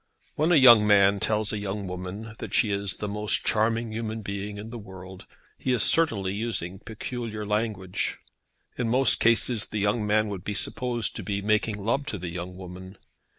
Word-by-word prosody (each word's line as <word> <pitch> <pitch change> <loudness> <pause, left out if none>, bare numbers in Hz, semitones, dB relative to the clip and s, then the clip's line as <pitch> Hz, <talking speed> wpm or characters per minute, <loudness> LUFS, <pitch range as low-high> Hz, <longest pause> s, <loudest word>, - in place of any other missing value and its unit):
When 155 +4 +1
a - - +6
young 120 -7 +8
man 100 -1 +5
tells 110 +1 0
a 105 - -2
young 100 0 -4
woman 95 +5 -6
that - - -5
she 110 - +3
is 100 -1 -1
the 105 - -4
most 105 +1 0
charming 115 +1 +1
human 110 0 -4
being 100 +1 -5
in 110 +2 -8
the 120 - -7
world, 95 -2 -11 0.3
he 130 - 0
is 120 - +2
certainly 105 -13 +3
using 100 -4 -3
peculiar 110 -1 -6
language. 105 -3 -2 0.6
In 120 -2 0
most 130 +1 +3
cases 115 -1 +3
the 105 - -5
young 105 +1 0
man 110 +1 +2
would 95 -3 -6
be 105 0 -4
supposed 120 +1 0
to - - -5
be 100 -1 -3
making 105 0 +1
love 135 +5 0
to 110 - -3
the 90 -1 -5
young 90 +1 -6
woman. 95 +1 -10
105 Hz, 190 wpm, -26 LUFS, 100-115 Hz, 0.6 s, young